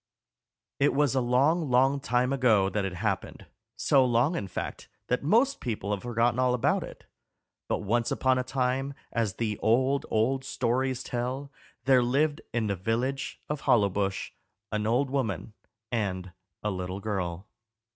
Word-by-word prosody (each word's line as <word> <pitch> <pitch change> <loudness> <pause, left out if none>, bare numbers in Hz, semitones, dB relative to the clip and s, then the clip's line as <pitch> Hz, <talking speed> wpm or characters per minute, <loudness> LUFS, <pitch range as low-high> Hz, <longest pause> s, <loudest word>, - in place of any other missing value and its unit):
It 140 0 +3
was 145 -2 +3
a 130 - +2
long, 140 +6 +2
long 135 +3 +4
time 125 -1 +1
ago 110 -8 +3
that 100 -1 -1
it 95 -2 -4
happened 100 +1 -3 0.3
so 135 -2 +4
long, 125 +6 +2
in 100 - -3
fact, 90 - -6 0.2
that 125 - +1
most 235 - +2
people 105 -4 -3
have 100 -2 -1
forgotten 120 0 +1
all 125 -1 +3
about 120 - +1
it - - -11 0.6
but - - -1
once 115 +3 +1
upon 130 -1 +2
a - - 0
time, 130 +2 -1 0.2
as 110 -5 -1
the 110 -3 -2
old, 130 +5 +2
old 130 +5 +1
stories 130 0 -1
tell, 130 +3 -3 0.3
there 130 -1 +5
lived 145 +5 +1
in 115 -2 0
the 100 -1 0
village 120 +8 -2
of 150 -1 -3
Hollowbush 100 -3 +1 0.4
an 105 0 -1
old 130 +4 +1
woman 110 -7 -2 0.4
and 95 -5 -2 0.3
a 105 - 0
little 90 0 -4
girl. 95 -4 -3
120 Hz, 155 wpm, -28 LUFS, 105-135 Hz, 0.6 s, there